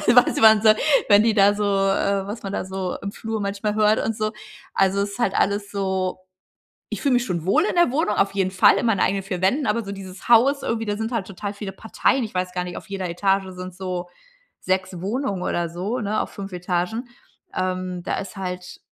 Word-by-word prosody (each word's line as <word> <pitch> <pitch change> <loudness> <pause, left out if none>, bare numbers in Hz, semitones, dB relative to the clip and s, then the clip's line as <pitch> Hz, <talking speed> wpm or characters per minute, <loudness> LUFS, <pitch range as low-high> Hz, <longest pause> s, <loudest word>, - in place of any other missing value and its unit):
was 245 - +5
man 220 -1 +7
so, 215 - +8 0.4
wenn 205 0 +7
die 225 -1 +2
da 200 -1 +5
so 210 0 -2
äh, 195 0 +1
was 210 +3 -6
man 195 - -4
da - - -2
so 190 -1 -4
im 200 - -3
Flur 225 +1 -4
manchmal 205 +1 -2
hört 215 0 +3
und 220 -1 -2
so. 215 -1 -1 0.4
Also, 195 +1 +2
es 200 0 -2
ist - - -9
halt 235 -5 +1
alles 200 +1 +1
so 190 -2 -1 0.7
ich - - -4
fühle 275 -3 +3
mich 245 0 +2
schon 170 -7 -3
wohl 305 - +3
in - - -1
der 345 -7 +4
Wohnung, 270 -5 +1
auf 195 - +2
jeden 190 -2 +1
Fall 185 - +5
in - - -1
meinen 220 -4 +2
eigenen 195 0 +1
4 185 -2 -4
Wänden. 265 +10 +2
Aber 230 +2 +1
so 200 - -6
dieses 190 -1 -9
Haus 260 +4 +5
irgendwie, 225 -1 -1
da 205 0 -1
sind 220 +1 -2
halt 220 -5 -1
total 200 +1 -6
viele 200 -1 -6
Parteien. 225 +6 0
Ich 215 - -8
weiß 180 0 -1
gar 180 0 -2
nicht, 180 -1 -6
auf - - -9
jeder 195 -2 -3
Etage 195 +3 +1
sind 185 0 -7
so 180 -1 -4 0.5
6 185 -1 -1
Wohnungen 200 -1 -2
oder 170 -2 -1
so, 190 +9 -3
ne, 210 +1 -1
auf - - -3
5 195 -1 -8
Etagen. 180 +7 -2 0.5
Ähm, 185 -1 -2
da - - -2
ist 200 +1 -7
halt 180 -1 -6
200 Hz, 230 wpm, -23 LUFS, 185-215 Hz, 0.7 s, so